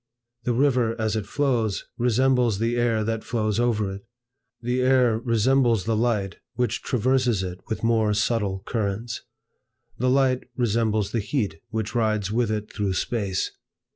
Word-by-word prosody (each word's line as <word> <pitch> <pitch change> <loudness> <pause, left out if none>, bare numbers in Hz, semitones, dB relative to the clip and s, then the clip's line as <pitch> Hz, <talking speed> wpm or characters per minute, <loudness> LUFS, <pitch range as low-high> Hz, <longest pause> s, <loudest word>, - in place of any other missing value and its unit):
The 120 - +1
river, 125 -3 +2
as 110 0 0
it 105 -2 -3
flows, 120 -6 0
resembles 125 -2 +2
the 115 +3 0
air 120 -2 +1
that 115 0 -2
flows 110 -2 -1
over 110 -5 +1
it; 100 - -8 0.6
the 125 +2 -1
air 125 -3 +4
resembles 120 -1 +2
the 115 0 0
light 105 -4 0 0.2
which 120 -2 0
traverses 125 -4 +1
it 90 0 -5
with 110 - -4
more 115 -2 +3
subtile 100 -3 0
currents; 110 +1 -2 0.8
the 125 +2 +2
light 130 -1 +2
resembles 110 -3 +1
the 115 - 0
heat 105 - -2
which 110 -1 -3
rides 110 -4 0
with 115 0 +1
it 105 -1 -3
through 100 -3 -1
Space. 100 -3 -1
115 Hz, 150 wpm, -25 LUFS, 105-125 Hz, 0.8 s, air